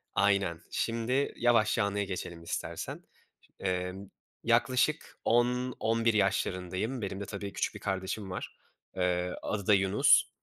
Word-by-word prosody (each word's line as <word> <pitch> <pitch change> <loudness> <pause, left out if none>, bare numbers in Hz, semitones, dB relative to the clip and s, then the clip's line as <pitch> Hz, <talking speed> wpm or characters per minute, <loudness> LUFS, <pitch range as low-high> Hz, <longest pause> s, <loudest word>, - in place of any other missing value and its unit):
aynen 100 -4 +2
şimdi 115 +4 0
yavaşça 115 -2 +3
anıya 100 0 0
geçelim 85 -3 -5
istersen. 85 - -4 0.6
Emm, 95 +1 -2 0.3
yaklaşık 125 +6 +2
10-11 120 -1 +2
yaşlarındayım. 95 +3 0
Benim 95 -1 -4
de 100 - -4
tabii 100 0 -6
küçük - - -1
bir - - -6
kardeşim 95 +1 -3
var, 90 - -6 0.4
eee, 90 -1 0
adı 100 -3 -3
da 105 - +6
Yunus. 95 0 +5
100 Hz, 120 wpm, -30 LUFS, 95-115 Hz, 0.6 s, da